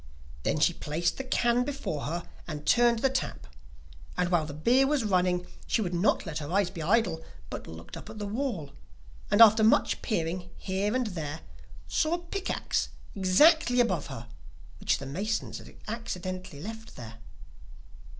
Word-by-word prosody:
Then 155 - 0
she 175 +3 +4
placed 165 +2 -1
the 270 - -3
can 245 -1 +2
before 265 - -3
her, 170 +3 -3 0.2
and 150 -3 -6
turned 240 -1 +4
the 270 - +5
tap, 265 - -3 0.7
and 180 -1 +1
while 165 -4 +2
the 145 - -6
beer 250 - +4
was 290 -3 +1
running 180 -3 +2 0.2
she - - +1
would 185 -5 -1
not 175 +4 +2
let 150 - -3
her 145 +1 -6
eyes 195 -1 +2
be 165 - -6
idle, 180 -2 +2 0.3
but - - -6
looked 80 +1 -9
up - - -9
at 220 - -9
the 210 - -4
wall, 205 - -3 0.6
and 205 - +4
after 220 0 +8
much 220 - +3
peering 175 -3 -2
here 200 +4 -1
and 255 -1 +1
there, 160 -6 -4 0.5
saw 315 +2 +1
a - - -2
pick 360 +3 -5
axe - - -1 0.2
exactly 245 - +5
above 185 -11 +2
her, 115 +1 -8 0.5
which - - +1
the 140 - -7
masons 200 +11 -2
had - - -13
accidentally 185 -8 -5
left 225 +1 -8
there. 115 -2 -9
190 Hz, 170 wpm, -29 LUFS, 165-235 Hz, 0.7 s, after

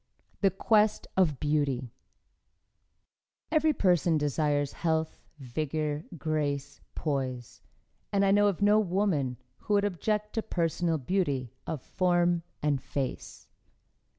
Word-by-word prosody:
THE 195 - +4
QUEST 210 +3 +2
OF 160 -8 +2
BEAUTY 140 -5 0 1.6
Every 310 -1 +4
person 175 - +2
desires 145 -1 0
health, 160 -1 -1 0.2
vigor, 150 +3 -3
grace, 145 -3 -2
poise 130 -5 -3 0.5
and 200 -1 +3
I 195 - +4
know 205 +1 +5
of 200 0 0
no 210 +1 +5
woman 175 - 0 0.2
who 210 - -1
would 200 0 +3
object 210 +2 -1
to 225 - 0
personal 165 -3 0
beauty 140 - -1
of 155 -6 -4
form 175 -1 +2 0.2
and 145 -3 +1
face. 135 -3 -5
160 Hz, 115 wpm, -29 LUFS, 145-195 Hz, 1.6 s, know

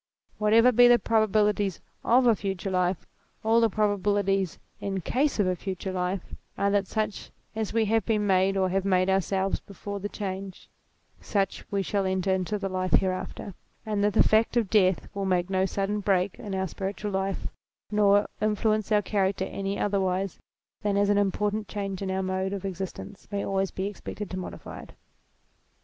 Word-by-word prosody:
Whatever 225 +3 +5
be 245 +1 +7
the 240 0 +7
probabilities 210 -4 +1 0.2
of 250 +2 +4
a 230 -2 +5
future 195 -1 -3
life, 180 -1 0 0.4
all 225 +1 +4
the 230 - +4
probabilities 200 -3 +1 0.2
in 195 -1 -3
case 275 - 0
of 205 - +4
a 185 0 +1
future 190 +1 -4
life 180 0 -3 0.2
are 200 0 +1
that 200 -1 +1
such 215 0 -3 0.3
as 220 -2 -2
we 225 0 +2
have 225 +1 +2
been 215 -2 0
made 190 0 +3
or 190 -1 +2
have 190 +1 0
made 185 -1 +2
ourselves 190 +1 0
before 200 +1 -7
the 205 +1 -4
change, 195 -2 -6 0.5
such 195 -2 -1
we 200 -1 0
shall 195 +1 0
enter 190 0 +1
into 190 +3 -1
the 195 - -3
life 185 -1 -2
hereafter; 190 +1 0 0.3
and 210 -2 -1
that 205 0 +2
the - - +5
fact 220 +2 +3
of 225 -5 +1
death 190 -4 +3
will 200 -1 -3
make 180 0 0
no 190 0 +2
sudden 200 +2 -1
break 190 -2 +1
in 200 -2 -5
our 190 0 -1
spiritual 195 +3 -4
life, 190 0 -2 0.4
nor 205 -1 +4 0.2
influence 215 0 +1
our 210 -1 +4
character 190 -1 0
any 195 +1 -3
otherwise 195 -2 -1 0.4
than 205 -1 0
as 205 0 +3
any 205 0 +4
important 205 +2 -1
change 195 -2 -4
in 195 - -2
our 190 0 -1
mode 190 +1 -1
of 195 -1 -4
existence 195 +1 -6
may 200 -1 -2
always 195 -1 0
be 190 - -4
expected 205 0 -6
to 185 - -3
modify 185 - -8
it. - - -14
195 Hz, 180 wpm, -27 LUFS, 190-210 Hz, 0.5 s, be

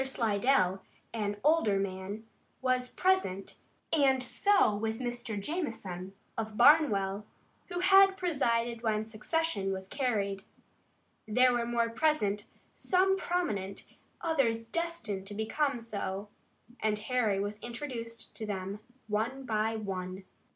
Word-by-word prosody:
Slidell, 220 -6 +2 0.3
an 205 -2 -2
older 300 -10 +4
man, 195 +2 -4 0.4
was 255 -1 +1
present 365 - 0 0.4
and 270 -4 +4
so 325 - +3
was 220 +2 -2
Mr. 240 -3 -3
Jamison, 200 - -4 0.2
of 220 -1 -4
Barnwell, 210 -8 +4 0.4
who 355 -1 -3
had 390 0 +6
presided 235 -10 0
when 220 -2 0
secession 220 -1 -1
was 190 0 -4
carried. 200 -6 -1 0.8
There 250 +3 +4
were 235 -1 0
more 235 -1 +1
present, 230 -7 +1 0.3
some 380 +1 +2
prominent, 215 - -2 0.4
others 255 -9 +1
destined 235 - -3
to 205 - -7
become 250 +5 0
so, 205 -3 -4 0.5
and 215 -1 +1
Harry 220 -2 +1
was 205 +1 -3
introduced 235 -2 -6
to 220 - -4
them 195 0 -4 0.3
one 225 +6 -1
by 220 -1 0
one. 190 -3 -4
225 Hz, 115 wpm, -31 LUFS, 205-270 Hz, 0.8 s, had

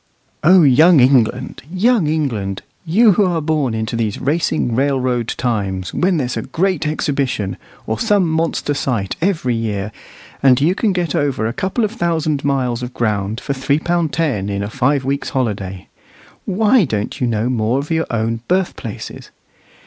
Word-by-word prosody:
O 180 +2 +6
young 155 +4 +6
England! 125 -3 +2
young 200 -1 +2
England! 115 -11 -2 0.2
you 210 +7 +5
who 200 +2 +3
are 175 -2 0
born 150 -6 0
into 110 +2 -3
these 110 -3 -2
racing 140 -4 0
railroad 130 -2 0
times, 100 -6 -2
when 180 -1 +1
there's 130 -4 -2
a - - -2
Great 185 -3 -1
Exhibition, 135 -9 -1 0.3
or 110 - -2
some 205 -5 +2
monster 160 -2 -1
sight, 115 -9 -2
every 160 -9 0
year, 105 -3 -2 0.5
and 130 -2 +5
you 160 +6 +3
can 210 +2 0
get 175 -5 -1
over 140 -6 0
a 115 - -1
couple 195 - -1
of 210 - 0
thousand 160 - -1
miles 130 -4 0
of 125 0 -6
ground 105 -1 -1
for 140 - -3
three 140 +2 0
pound 170 -1 0
ten 130 -14 -1
in 100 0 -2
a 100 - -5
five 135 +1 +1
weeks' 140 +1 -2
holiday, 100 -8 -3 0.6
why 215 +4 +3
don't 105 - -3
you 125 - +2
know 115 0 0
more 120 0 0
of 145 +3 -4
your 160 0 0
own 115 0 -1
birthplaces? 180 - -3
135 Hz, 165 wpm, -18 LUFS, 115-165 Hz, 0.6 s, O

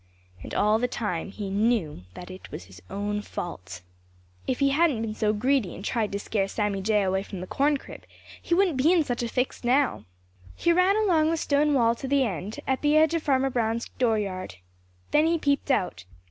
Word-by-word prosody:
And - - -7
all 210 +1 +3
the 250 - +1
time 205 -8 -3
he 200 -1 -6
knew 200 - 0
that 180 - -9
it 185 - -11
was - - -7
all - - -18
his 90 -2 -13
own 205 +1 -2
fault. 90 - -7 0.6
If 255 - 0
he 275 -1 +3
hadn't 280 -5 +2
been 220 -1 -3
so 215 -1 +1
greedy 235 -1 0
and 195 - -9
tried 220 -3 -1
to 200 - -2
scare 200 -1 -1
Sammy 205 -1 -2
Jay 210 +1 +2
away 190 0 0
from 195 -1 -8
the 180 - -5
corn 285 +8 +1
crib, - - -12 0.4
he 340 - 0
wouldn't 365 -6 +2
be 290 +6 +4
in 350 -3 +4
such 245 -4 -3
a 240 - -1
fix 250 +3 -2
now. 260 +3 +1 0.5
He 340 - +2
ran 365 +3 +4
along 340 -8 +3
the 330 - 0
stone 295 -1 +2
wall 230 -3 +4
to 250 +3 -7
the 280 0 +3
end 195 0 -4
at 265 -1 -1
the 295 +1 +3
edge 315 +1 +4
of 330 - 0
Farmer 270 -2 +1
Brown's 230 -1 -1
dooryard. 200 - -1 0.6
Then 305 +2 +4
he 335 0 +2
peeped 285 -2 0
out. 185 - 0
235 Hz, 215 wpm, -26 LUFS, 200-285 Hz, 0.6 s, be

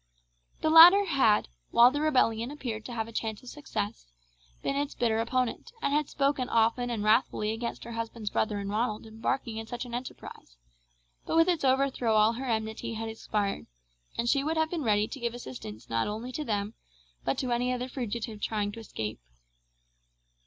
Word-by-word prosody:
The 315 - +2
latter 350 +5 +10
had, 265 - +3 0.2
while 240 +2 +7
the 290 +2 -2
rebellion 250 -6 +2
appeared 240 -7 -5
to - - -7
have 225 -2 -3
a - - -9
chance 220 0 -4
of 250 - -9
success, 210 - -5 0.6
been 275 - -1
its 285 0 -2
bitter 225 -2 +1
opponent, 250 - -1
and 280 - 0
had 300 -1 +1
spoken 275 -2 0
often 230 +2 +2
and 225 -3 -2
wrathfully 215 -1 +2
against 235 +1 -4
her 235 - -8
husband's 230 -2 -4
brother 210 -1 0
and 200 0 -4
Ronald 215 0 -1
embarking 225 +1 -3
in 225 0 -5
such 240 +1 -5
an 240 - -9
enterprise; 240 - -8 0.7
but - - -1
with 330 +1 +6
its 345 -5 +1
overthrow 260 -4 +2
all 215 +1 +5
her 260 +3 -5
enmity 220 0 -2
had 225 0 -4
expired, 210 -2 -2 0.5
and 235 - 0
she 275 +3 +3
would 320 +2 -1
have 315 0 +1
been 340 -3 -2
ready 210 -4 +2
to 275 - -8
give 235 -1 -2
assistance 125 - -8
not 115 0 0
only 220 +4 -4
to 305 - -3
them, 210 -4 -2 0.5
but 135 - 0
to 255 -2 -2
any 245 +1 +1
other 250 0 -2
fugitive 235 -4 -4
trying 205 -1 -1
to 230 - -9
escape. 110 - -5
235 Hz, 190 wpm, -29 LUFS, 220-265 Hz, 0.7 s, latter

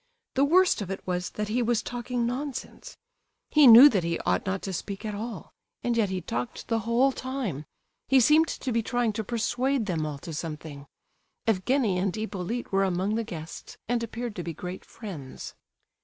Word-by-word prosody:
The 270 - +3
worst 360 - +4
of 195 - -5
it 195 - -5
was 180 0 -2
that 210 0 -4
he 240 +3 +1
was 235 -1 +1
talking 245 0 -2
nonsense; 260 +2 -5 0.5
he 300 -3 +7
knew 240 +4 +11
that 195 -9 0
he 170 0 -1
ought - - 0
not 190 0 -2
to 190 - -4
speak 200 +4 -5
at 210 - -3
all, 225 +3 -6 0.3
and 240 -1 +1
yet 220 -4 +2
he 185 -1 -2
talked 125 -7 -5
the 230 -1 +2
whole 235 +5 +2
time; 255 - -4 0.4
he 270 - +5
seemed 300 +6 +5
to 260 - -4
be 230 0 +2
trying 240 -1 0
to 220 - -3
persuade 245 +3 0
them 170 -6 -1
all 150 -2 -5
to 165 +3 -8
something. 150 -2 -6 0.6
Evgenie 225 -1 +1
and 190 +1 0
Hippolyte 215 +2 -4
were 195 0 +3
among 190 +2 0
the 230 +1 0
guests, 165 -7 -8
and 240 0 0
appeared 230 0 -5
to 175 - -3
be 170 - -4
great 180 +1 -6
friends. 170 - -8
220 Hz, 190 wpm, -27 LUFS, 185-245 Hz, 0.6 s, knew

